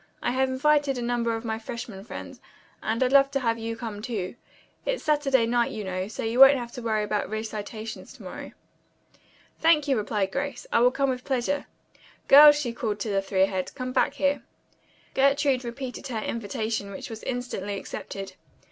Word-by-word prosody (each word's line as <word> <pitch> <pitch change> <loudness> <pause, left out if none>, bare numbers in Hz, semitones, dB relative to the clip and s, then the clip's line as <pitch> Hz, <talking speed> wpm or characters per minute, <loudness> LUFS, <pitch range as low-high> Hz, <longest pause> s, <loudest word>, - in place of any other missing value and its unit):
I - - +1
have 260 +1 +1
invited 285 0 +2
a - - -3
number 235 -1 0
of 225 +1 -6
my 220 -1 -2
freshmen 225 -4 -7
friends, - - -9 0.4
and 225 +3 0
I'd 255 - +1
love 275 0 +6
to 275 - -1
have 230 -3 0
you 225 0 -3
come, 220 -3 -6
too. 210 -6 -3 0.5
It's - - -2
Saturday 280 -5 +3
night 235 0 +2
you 215 - -5
know, 185 0 -3
so 220 - -6
you 225 +3 -1
won't 270 +1 +9
have 240 -2 -6
to 245 - -7
worry 220 -2 0
about 210 0 -1
recitations 220 0 -6
to - - -14
morrow." - - -8 1.1
"Thank 320 -3 +4
you," 275 - +3
replied 205 -3 -1
Grace. 280 +3 -3
"I - - +5
will 245 +1 +6
come 270 +1 0
with 250 0 -5
pleasure. 280 +2 -1 0.6
Girls," 295 +1 +10
she 245 -5 -2
called 215 -3 -3
to 220 - -2
the 195 -1 +1
three 195 -1 +1
ahead, 190 -1 -2
"come 255 -1 -4
back 275 - +2
here." 285 0 +1 0.7
Gertrude 275 -1 +3
repeated 250 +2 -6
her 245 -4 -4
invitation, 215 -1 -3
which 200 +3 -7
was 220 - -7
instantly 235 -6 -4
accepted. 195 0 -7
235 Hz, 190 wpm, -26 LUFS, 215-270 Hz, 1.1 s, Girls